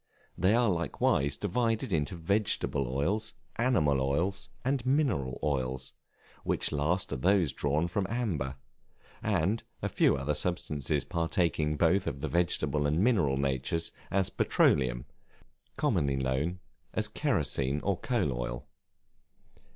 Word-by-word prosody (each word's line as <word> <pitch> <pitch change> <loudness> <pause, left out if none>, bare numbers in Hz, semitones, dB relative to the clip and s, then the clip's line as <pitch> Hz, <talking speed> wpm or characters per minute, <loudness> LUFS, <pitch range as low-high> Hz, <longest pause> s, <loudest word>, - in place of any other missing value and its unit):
They 95 +5 +3
are 120 0 +3
likewise 70 -5 +1
divided 115 - 0
into 75 +1 0
vegetable 85 - +1
oils, 90 - -1 0.2
animal 85 - +2
oils, 85 +9 -1 0.2
and 135 -1 +1
mineral 125 - +1
oils; 65 -2 -2 0.5
which - - 0
last 80 +6 0
are - - -2
those 90 +2 +2
drawn 75 +4 0
from 95 +2 -1
amber, 90 - -2 0.7
and 105 +1 +1 0.2
a - - 0
few - - +3
other 70 +3 -1
substances 75 -3 -1
partaking 80 0 0
both 85 +5 +3
of 70 0 -3
the 80 - -1
vegetable 75 -4 +1
and 75 +3 +1
mineral 90 - +3
natures, 70 +4 -1 0.2
as 95 -1 0
Petroleum, 60 -2 +2 0.7
commonly 70 -1 +1
known 65 +7 -1 0.3
as - - +1
kerosene 70 +2 0
or 100 -1 +1
coal 105 - 0
oil. - - -4
80 Hz, 125 wpm, -30 LUFS, 70-100 Hz, 0.7 s, They